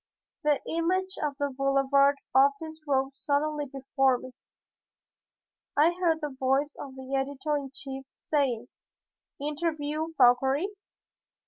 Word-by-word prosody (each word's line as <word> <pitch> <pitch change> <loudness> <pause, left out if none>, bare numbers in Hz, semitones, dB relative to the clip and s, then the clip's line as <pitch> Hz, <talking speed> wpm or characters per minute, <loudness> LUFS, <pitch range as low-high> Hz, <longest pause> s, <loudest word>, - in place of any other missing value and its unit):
The 295 -2 +3
image 370 +3 0
of 295 -2 -1
the 285 -1 -1
Boulevard 275 +1 +3 0.2
office 280 +4 +3
rose 270 -1 +1
suddenly 295 +1 0
before 270 -1 +1
me. 255 - -10 1.5
I 310 +4 +6
heard 345 -3 +1
the 295 -3 -4
voice 270 +3 +1
of 265 -2 -8
the 265 0 -8
editor 280 +2 -1
in 280 -2 -3
chief 270 0 -6
saying, 255 -6 -1 0.7
"Interview 300 +1 -2
Fauchery? 265 +7 +4
280 Hz, 115 wpm, -28 LUFS, 270-305 Hz, 1.5 s, I